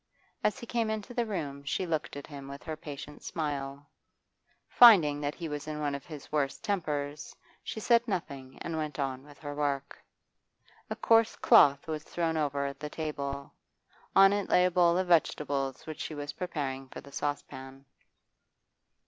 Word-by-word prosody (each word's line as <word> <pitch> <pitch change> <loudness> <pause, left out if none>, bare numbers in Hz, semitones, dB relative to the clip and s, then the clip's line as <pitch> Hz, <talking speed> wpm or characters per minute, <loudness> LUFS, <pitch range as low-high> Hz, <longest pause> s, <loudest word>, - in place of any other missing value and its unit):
As 210 - +2
he - - -8
came 230 -1 0
into 220 +2 -4
the 240 -1 0
room 145 -9 -4
she 140 +6 -1
looked 160 -4 -2
at 145 - -7
him 140 -2 -9
with 140 +1 -9
her 160 -2 -4
patient 150 -2 -9
smile; 145 -3 -4 0.8
finding 170 -12 +7
that 145 0 -2
he 170 - -5
was 150 -1 -5
in 155 -1 -4
one 145 -1 -1
of 140 - -6
his 150 -4 -10
worst 145 +2 -1
tempers, 150 -8 -2 0.3
she - - -5
said 235 +2 +3
nothing 140 - -4
and 165 -1 -3
went 150 -3 -3
on 135 -2 -2
with 145 0 -15
her 145 -1 -6
work. 140 -1 -2 0.9
A - - -2
coarse 225 -1 +4
cloth 140 - +6
was 155 -1 -3
thrown 165 -1 -1
over 140 -2 -1
the 150 +2 -7
table; 140 -3 -4 0.6
on 195 0 +8
it 205 -1 -1
lay 180 - +5
a 180 - +2
bowl 175 -1 +4
of 185 - +1
vegetables 145 -5 +1
which 155 -1 -7
she 155 - -4
was 145 0 -5
preparing 140 -7 -4
for - - -8
the 140 - -13
saucepan. 135 -2 -5
150 Hz, 175 wpm, -30 LUFS, 140-175 Hz, 0.9 s, on